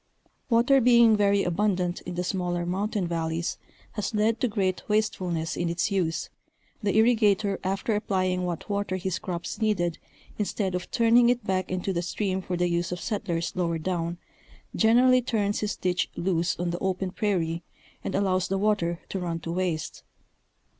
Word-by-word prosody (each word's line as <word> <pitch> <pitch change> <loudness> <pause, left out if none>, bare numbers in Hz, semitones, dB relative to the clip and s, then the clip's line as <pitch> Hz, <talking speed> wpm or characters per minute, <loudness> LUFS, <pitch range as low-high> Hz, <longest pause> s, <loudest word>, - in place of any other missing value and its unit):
Water 245 +3 +4
being 235 -2 +6
very 200 -1 +3
abundant 180 -1 0
in 180 - -4
the 180 - -1
smaller 175 -1 -1
mountain 195 +2 -1
valleys 165 0 -2 0.3
has 215 +1 -3
led 220 +2 +2
to 250 - +3
great 195 -4 -1
wastefulness 185 -6 0
in 175 - -1
its 170 +4 0
use, 175 -5 -1 0.5
the 205 -1 +1
irrigator 215 -4 +3
after 195 +4 -1
applying 185 -3 0
what 175 -2 -4
water 200 -2 -1
his 185 -1 -2
crops 180 +4 -5
needed, 175 -6 0 0.4
instead 200 -2 -1
of 180 0 -3
turning 235 +1 +5
it 245 -1 +1
back 185 -2 -1
into 185 +1 -1
the 170 - 0
stream 190 +2 -2
for 180 -1 -3
the 175 0 +2
use 175 +1 -1
of 180 - -3
settlers 190 -7 -2
lower 170 -2 0
down, 170 0 -2 0.6
generally 250 +3 +5
turns 210 -4 0
his 210 -1 -2
ditch 180 0 -1
loose 170 -1 0
on 175 -1 -1
the 175 - -3
open 190 -1 -1
prairie 170 -5 -1 0.4
and - - -3
allows 185 -2 +1
the 195 - -1
water 190 -5 +1
to 195 - -4
run 170 -2 -3
to 165 - -5
waste. 170 -3 -2
185 Hz, 165 wpm, -27 LUFS, 175-210 Hz, 0.6 s, being